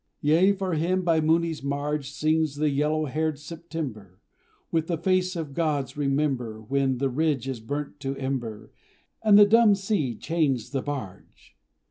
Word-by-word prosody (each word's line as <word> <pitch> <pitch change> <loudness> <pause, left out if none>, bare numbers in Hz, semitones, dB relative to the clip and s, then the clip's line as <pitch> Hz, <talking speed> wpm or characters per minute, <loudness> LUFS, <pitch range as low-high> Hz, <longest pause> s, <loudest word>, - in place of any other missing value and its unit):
Yea, 165 +7 +4
for 190 -2 -2
him 180 +4 0
by 165 -2 +2
Mooni's 160 0 +1
marge 145 0 -2
Sings 155 +1 0
the 150 0 +1
yellow 150 +2 +1
haired 155 +2 -1
September, 150 - -7 0.5
With 165 -1 0
the 170 - -1
face 185 +2 +1
the 165 - -2
gods 145 -2 -2
remember 135 -6 -1
When 135 +3 0
the 135 +2 0
ridge 145 -2 0
is 130 -3 -3
burnt 145 +6 -5
to 135 -1 -3
ember, 120 -5 -4 0.5
And 215 -2 +6
the 205 - +9
dumb 220 0 +5
sea 190 - -1
chains 145 -5 -1
the 135 -2 -1
barge! 130 -11 -8
150 Hz, 155 wpm, -26 LUFS, 135-165 Hz, 0.5 s, the